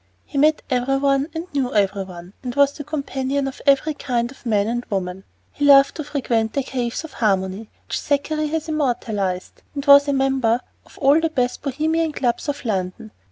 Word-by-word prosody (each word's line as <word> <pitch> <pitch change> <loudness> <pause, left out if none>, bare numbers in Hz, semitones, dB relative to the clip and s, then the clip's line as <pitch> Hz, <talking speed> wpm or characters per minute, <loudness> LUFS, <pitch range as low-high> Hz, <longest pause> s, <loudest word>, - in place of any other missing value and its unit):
He 280 - -3
met 305 +2 +3
every 260 +1 +1
one 275 0 +2
and 325 +1 -3
knew 265 -4 -1
every 200 -1 +2
one, 180 0 -11
and 250 -1 -5
was 280 0 +4
the 290 - -8
companion 280 -2 -2
of 270 - -7
every 280 +3 +4
kind 245 -4 -2
of 265 - -12
man 205 -3 +2
and 240 +1 -2
woman. 190 -2 -4 0.3
He 290 - -5
loved 275 -1 +7
to 310 - -5
frequent 235 -6 -1
the 275 - 0
"caves 245 +1 -3
of 320 -3 -10
harmony" 195 -1 -1 0.2
which - - -2
Thackeray 305 +2 -1
has 320 +1 -3
immortalized, 225 -11 -2
and 280 0 -4
he 285 - +6
was 280 +1 +8
a 285 - +1
member 265 -3 +1 0.3
of - - -18
all 285 +3 +4
the 325 - +1
best 250 -5 -1
Bohemian 310 +3 0
clubs 250 +2 -1
of 285 -2 -4
London. 190 0 -3
270 Hz, 200 wpm, -21 LUFS, 225-285 Hz, 0.3 s, was